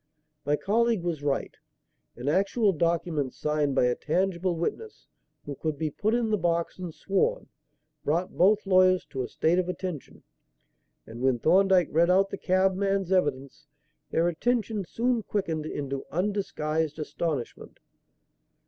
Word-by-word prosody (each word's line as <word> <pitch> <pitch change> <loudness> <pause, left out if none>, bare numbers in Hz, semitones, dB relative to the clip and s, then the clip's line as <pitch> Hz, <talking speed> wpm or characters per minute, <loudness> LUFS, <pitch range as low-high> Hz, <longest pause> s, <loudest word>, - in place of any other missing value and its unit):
My 145 - +3
colleague 225 +3 +1
was 170 -4 -2
right. 140 -1 -2 0.6
An 125 +3 -7
actual 195 +6 +2
document, 165 -4 -1
signed 150 -2 0
by 130 - +4
a 125 - +2
tangible 180 +4 -1
witness, 415 - -4 0.4
who 145 - -5
could 155 +2 -3
be 155 0 -2
put 215 +9 0
in 235 -2 0
the 210 - +1
box 170 0 -1
and 180 -2 -5
sworn, 330 - -1 0.5
brought 170 +5 -1
both 205 +4 +3
lawyers 185 -1 +4
to 130 - -3
a 125 - -3
state 170 +3 +1
of 180 -1 -1
attention; 180 -5 -6 0.8
and 115 +2 -9
when 130 -1 +2
Thorndyke 185 +5 +4
read 170 +2 +3
out 195 +2 +3
the - - -4
cabman's 190 0 +1
evidence, 145 -5 -1 0.4
their 165 +1 +1
attention 215 +3 -1
soon 235 +5 0
quickened 165 -8 -2
into 140 -3 -4
undisguised 160 -5 -1
astonishment. 155 -4 -4
175 Hz, 140 wpm, -27 LUFS, 150-195 Hz, 0.8 s, by